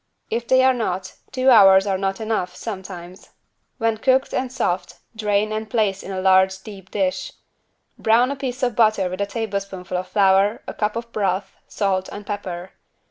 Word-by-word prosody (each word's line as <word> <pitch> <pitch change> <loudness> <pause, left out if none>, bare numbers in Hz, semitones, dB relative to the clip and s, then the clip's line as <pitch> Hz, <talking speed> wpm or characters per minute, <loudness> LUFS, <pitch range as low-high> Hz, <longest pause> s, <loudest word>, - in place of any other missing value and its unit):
If 235 +1 -2
they 260 0 +5
are 260 0 +5
not, 190 -6 -3 0.2
two 260 0 +3
hours 195 -4 +7
are 195 -2 0
not 195 0 -2
enough, 215 -5 -2
sometimes. 185 -4 -8 0.5
When 225 -1 0
cooked 265 +2 +2
and 255 -1 -1
soft, 185 -8 -2 0.2
drain 210 -1 0
and 215 0 -4
place 205 -5 0
in - - -9
a 190 -1 -3
large 190 0 +4
deep 195 -3 -11
dish. 200 - -2 0.7
Brown 235 +4 +3
a - - -2
piece 260 -1 -5
of 245 -3 +1
butter 215 -5 +3
with 185 +2 -4
a 200 - 0
tablespoonful 200 -4 -4
of 180 - -4
flour, 200 +1 +3
a - - -6
cup 210 0 -1
of 230 0 -5
broth, 195 -2 -1
salt 190 -2 -1
and 205 0 -8
pepper. 190 -3 -5
205 Hz, 180 wpm, -22 LUFS, 190-225 Hz, 0.7 s, hours